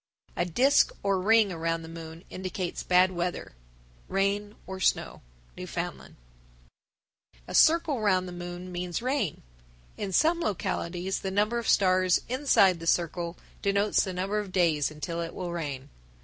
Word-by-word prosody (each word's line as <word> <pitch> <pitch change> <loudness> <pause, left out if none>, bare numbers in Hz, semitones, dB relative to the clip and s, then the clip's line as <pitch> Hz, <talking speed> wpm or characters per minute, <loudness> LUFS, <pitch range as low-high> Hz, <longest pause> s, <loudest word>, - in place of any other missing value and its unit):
A 175 - 0
disk 255 - +4
or 195 -2 +1
ring 220 0 +4
around 165 -1 -2
the - - -9
moon 165 +1 -9
indicates 185 -1 -4
bad 185 +1 +4
weather 175 0 -3 0.6
(rain 200 +2 -1
or 190 0 -7
snow). - - 0 0.3
Newfoundland. - - -6 1.3
996. - - -12
A - - -6
circle 315 -4 +4
round 185 -3 +2
the - - -7
moon 175 +1 -7
means 180 +4 -3
rain. 255 - -1 0.5
In 200 - -4
some 325 - +3
localities 185 - -2
the 190 - -3
number 210 +5 +1
of 235 - -3
stars 185 -2 +4
inside 235 -9 +3
the 165 - -7
circle 170 0 0 0.2
denotes 200 +1 +2
the 190 - -3
number 190 +3 -1
of 205 -3 -5
days 165 -6 +2
until 165 +3 -5
it 165 - -5
will 180 -2 -4
rain. 145 -5 -5
185 Hz, 150 wpm, -28 LUFS, 170-205 Hz, 1.3 s, disk